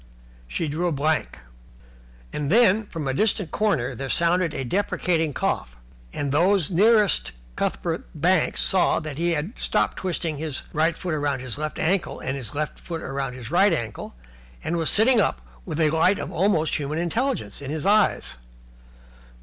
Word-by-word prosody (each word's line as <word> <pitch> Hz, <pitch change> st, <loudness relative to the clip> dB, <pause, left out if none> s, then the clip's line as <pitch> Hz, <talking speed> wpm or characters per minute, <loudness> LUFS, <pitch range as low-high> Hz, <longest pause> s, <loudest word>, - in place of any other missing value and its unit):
She 155 Hz, -, -2 dB
drew 170 Hz, +4 st, -1 dB
blank. 155 Hz, +2 st, 0 dB, 1.0 s
And 150 Hz, 0 st, -2 dB
then, 215 Hz, -1 st, +4 dB
from 160 Hz, -7 st, -5 dB
a 135 Hz, -, 0 dB
distant 200 Hz, +1 st, +1 dB
corner, 155 Hz, -, 0 dB
there 135 Hz, +3 st, -5 dB
sounded 170 Hz, +2 st, +2 dB
a 135 Hz, -, -3 dB
deprecating, 170 Hz, 0 st, 0 dB
cough, -, -, -2 dB, 0.3 s
and 140 Hz, -, -2 dB
those 180 Hz, +3 st, +2 dB
nearest 210 Hz, +2 st, +3 dB, 0.2 s
Cuthbert -, -, -2 dB
Banks -, -, +2 dB
saw -, -, +3 dB
that 155 Hz, -2 st, -6 dB
he 170 Hz, 0 st, +2 dB
had 165 Hz, +9 st, -4 dB
stopped -, -, 0 dB
twisting 170 Hz, -4 st, -2 dB
his 150 Hz, -2 st, -4 dB
right 160 Hz, +2 st, +1 dB
foot 180 Hz, -, -4 dB
round 145 Hz, -3 st, -1 dB
his 130 Hz, +1 st, -5 dB
left 155 Hz, 0 st, -4 dB
ankle 180 Hz, +2 st, 0 dB
and 130 Hz, -, -3 dB
his 130 Hz, -2 st, -6 dB
left 150 Hz, 0 st, -3 dB
foot 165 Hz, -2 st, -6 dB
round 135 Hz, -2 st, -3 dB
his 125 Hz, +1 st, -8 dB
right 195 Hz, +4 st, +5 dB
ankle 115 Hz, -, -3 dB, 0.5 s
and 170 Hz, -, -1 dB
was 165 Hz, -2 st, +1 dB
sitting 225 Hz, +2 st, +5 dB
up 60 Hz, -, 0 dB, 0.3 s
with 150 Hz, -, -3 dB
a 155 Hz, -2 st, +3 dB
light 165 Hz, +5 st, +3 dB
of -, -, -5 dB
almost 165 Hz, -4 st, +1 dB
human 150 Hz, +1 st, -3 dB
intelligence 225 Hz, -, -1 dB
in 140 Hz, -, -6 dB
his 155 Hz, +2 st, -3 dB
eyes. 205 Hz, -, +2 dB
160 Hz, 165 wpm, -24 LUFS, 145-185 Hz, 1.0 s, right